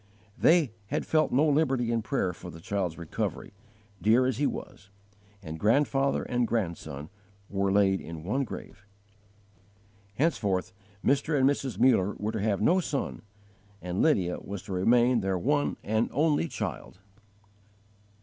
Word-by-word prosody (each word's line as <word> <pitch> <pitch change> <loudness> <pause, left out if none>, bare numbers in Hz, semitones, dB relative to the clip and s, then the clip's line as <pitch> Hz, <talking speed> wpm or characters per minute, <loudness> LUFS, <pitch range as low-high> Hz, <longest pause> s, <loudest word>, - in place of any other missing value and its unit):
They 160 -7 +4 0.2
had - - -2
felt 155 -1 +2
no 145 +5 +3
liberty 135 -5 +2
in 115 -1 +1
prayer 110 -6 -1
for 90 +1 -10
the 85 - -10
child's 90 -2 -2
recovery, 85 +3 -4 0.5
dear 115 +4 +4
as 130 -3 0
he 145 - +3
was; 100 - -7 0.5
and 80 -2 -7
grandfather 135 - +2
and 120 -1 0
grandson 85 -9 -3 0.4
were 100 0 0
laid 95 -1 +3
in 80 -1 -8
one 130 +10 0
grave. 105 -4 -9 1.3
Henceforth 100 - 0 0.3
Mr. 145 +3 +2
and 130 - +5
Mrs. 135 -6 -1
Muller 105 -6 +3
were 105 +1 -2
to 110 - -3
have 105 -1 0
no 180 +10 +4
son, 150 -6 -3 0.6
and 90 +2 -3
Lydia 95 - +2
was 100 -1 -7
to 95 - -6
remain 120 +6 +3
their 95 -2 -1
one 145 +9 0
and 110 +2 0
only 150 +2 +2
child. - - -5
110 Hz, 145 wpm, -28 LUFS, 95-135 Hz, 1.3 s, and